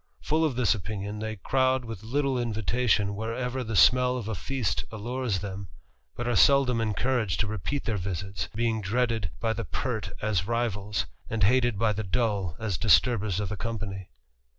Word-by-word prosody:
Full 155 +2 +2
of 150 -6 +1
this 120 -3 +3
opinion, 105 0 -5
they 110 0 -3
crowd 130 +4 +1
with 115 -4 -7
tie 140 - 0 0.2
invitation 110 -2 +1
wherever 125 +4 -3
the 110 -2 -4
smell 125 +4 +5
of 115 -4 -5
a 110 - -2
feast 130 +4 -2
allures 115 -2 -2
them, 100 -1 -5 0.5
It 120 - -3
are 120 - +1
seldom 125 +1 +5
encouraged 110 - 0
to - - +2
repeat 110 - -3
their 110 -3 -1
visits, 95 +1 -4
being 115 -1 0
eaded 115 -2 0
by 115 -1 0
the 115 +1 -3
pert 110 -8 -3
as 100 -4 0
rivals, 105 -3 -1 0.2
and 110 -2 -1
hated 120 +1 +3
by 110 0 +2
the 110 +2 -3
dull 100 -5 0
as 100 -9 -2
sturbers 105 -6 +4
of 105 -3 -2
the 105 - -4
company. 100 -3 -5
110 Hz, 175 wpm, -27 LUFS, 100-120 Hz, 0.5 s, smell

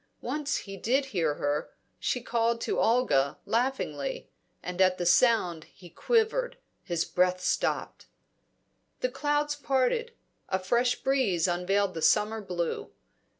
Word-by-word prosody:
Once 295 -1 -2
he 195 -1 -7
did 265 +8 +1
hear 170 - -1
her; 145 +1 -2 0.3
she 250 - -1
called 235 0 0
to - - -1
Olga, 225 - +2
laughingly; 265 - -2 0.3
and 180 +1 -3
at 185 -1 +4
the 175 - -2
sound 175 -6 +3
he 175 -3 -16
quivered, - - +1 0.2
his 170 -2 -2
breath 180 0 +1
stopped. - - -2 0.9
The 255 - +1
clouds 295 +2 0
parted; 280 - 0 0.4
a 190 - +1
fresh 240 +7 +1
breeze 220 -11 +2
unveiled 185 +2 0
the 165 - -5
summer 215 +5 +3
blue. 175 -4 -3
225 Hz, 130 wpm, -28 LUFS, 180-270 Hz, 0.9 s, at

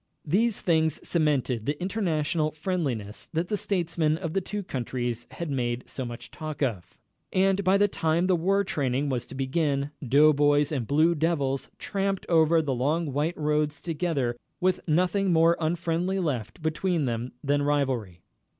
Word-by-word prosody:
These 210 +8 +1
things 160 -3 +2
cemented 140 -8 +1
the 145 +1 -1
international 165 -5 0
friendliness 145 - -3
that 165 +2 -1
the 210 - +1
statesmen 170 -6 0
of 165 -2 -4
the 195 - +1
two 205 +2 -4
countries 120 -4 -3
had 170 -3 -5
made 120 -2 -1
so 130 - -5
much 120 -1 -8
talk 155 -2 -5
of. 110 -10 -3 0.3
And 195 +1 +2
by 190 +1 +4
the 205 +1 +4
time 165 -2 +1
the 185 -1 +3
war 195 +4 +2
training 140 -4 -1
was 125 -2 -2
to - - -9
begin, 140 +1 0
doughboys 145 +1 +4
and 130 -7 -2
Blue 155 +4 +4
Devils 145 -4 0
tramped 195 -1 -2
over 160 -1 +4
the 140 -3 -1
long 145 +4 0
white 155 +5 -1
roads 150 0 0
together 155 -7 -1 0.2
with 185 0 +2
nothing 185 +4 +2
more 165 0 +5
unfriendly 170 +3 0
left 145 - -3
between 160 0 0
them 120 0 -3
than 145 0 +2
rivalry. 130 - -1
155 Hz, 160 wpm, -27 LUFS, 135-175 Hz, 0.3 s, more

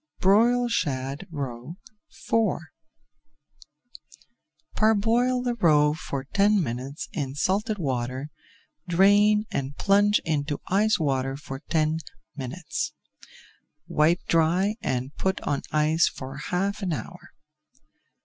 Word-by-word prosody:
BROILED 235 +5 +4
SHAD 140 - -2
ROE 140 0 -6 0.3
IV 225 -7 0 2.2
Parboil 230 +4 +2
the 245 -1 0
roe 150 -9 +4
for 140 -3 -5
ten 200 +8 +2
minutes 130 +3 -5
in 135 -3 -3
salted 205 +8 0
water, 130 -2 -3 0.6
drain, 205 +4 +4
and 140 +1 -3
plunge 205 +1 +4
into 145 -2 -1
ice 210 +3 +3
water 135 -3 -1
for 135 -2 -8
ten 155 +1 0 0.4
minutes. 150 +5 -4 0.9
Wipe 160 +4 +2
dry 170 +5 +2
and 130 +2 -3
put 190 0 0
on 145 -1 -1
ice 155 +2 +3
for 130 +1 -8
half 195 +7 -2
an 185 -4 -1
hour. - - -8
160 Hz, 105 wpm, -25 LUFS, 140-205 Hz, 2.2 s, BROILED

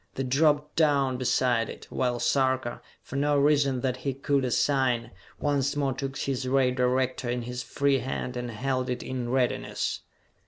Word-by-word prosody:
They 135 - -2
dropped 150 +3 +2
down 140 -5 +3
beside 125 -2 +1
it, - - -9
while 125 -2 0
Sarka, 130 -3 +1 0.2
for 140 - -6
no 145 +1 +2
reason 140 -3 +3
that 130 -1 -1
he 135 0 -3
could 140 0 0
assign, 125 -2 +1 0.3
once 140 -1 0
more 140 -2 0
took 135 +1 -4
his 135 -2 -2
ray 130 -1 +3
director 130 0 0
in 120 0 -1
his 125 +1 -5
free 140 +2 +1
hand 125 0 -4
and 120 0 -4
held 130 +3 -2
it 125 - -3
in 125 -2 -4
readiness. 125 -1 -1
130 Hz, 165 wpm, -27 LUFS, 125-140 Hz, 0.3 s, down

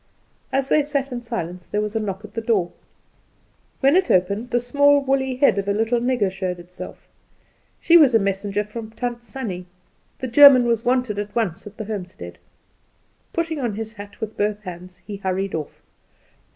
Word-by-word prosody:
As 270 0 0
they 300 - +4
sat 280 -2 -2
in 245 -1 -4
silence 180 -7 -5
there 210 - -1
was 210 +1 -3
a - - +2
knock 200 -1 -4
at 210 - -14
the 225 - -3
door. 210 -6 +1 1.1
When 275 +3 +5
it 375 0 +3
was - - +7
opened 200 +6 -5
the 240 - +2
small 285 +4 +4
woolly 265 -1 0
head 260 -6 +3
of 200 - -4
a 200 - +2
little 225 +3 +1
nigger 240 -5 +1
showed 185 -1 -3
itself. 175 +1 -10 0.7
She 340 0 +6
was 280 -7 +6
a - - +9
messenger 200 +1 -1
from 220 +1 -8
Tant 240 +1 -4
Sannie: 210 -8 -6 0.5
the - - -5
German 260 0 +8
was 230 -1 +1
wanted 250 -4 0
at 205 0 -5
once 200 -5 -1
at 210 - -12
the 220 - -5
homestead. 195 -4 -7 0.9
Putting 330 -3 -2
on 235 -6 -2
his 220 +1 -5
hat 205 -2 -11
with 220 0 -5
both 210 0 -1
hands, 180 -1 -10
he 205 -2 -6
hurried 195 0 -2
off. 155 -2 -6
220 Hz, 190 wpm, -22 LUFS, 195-255 Hz, 1.1 s, a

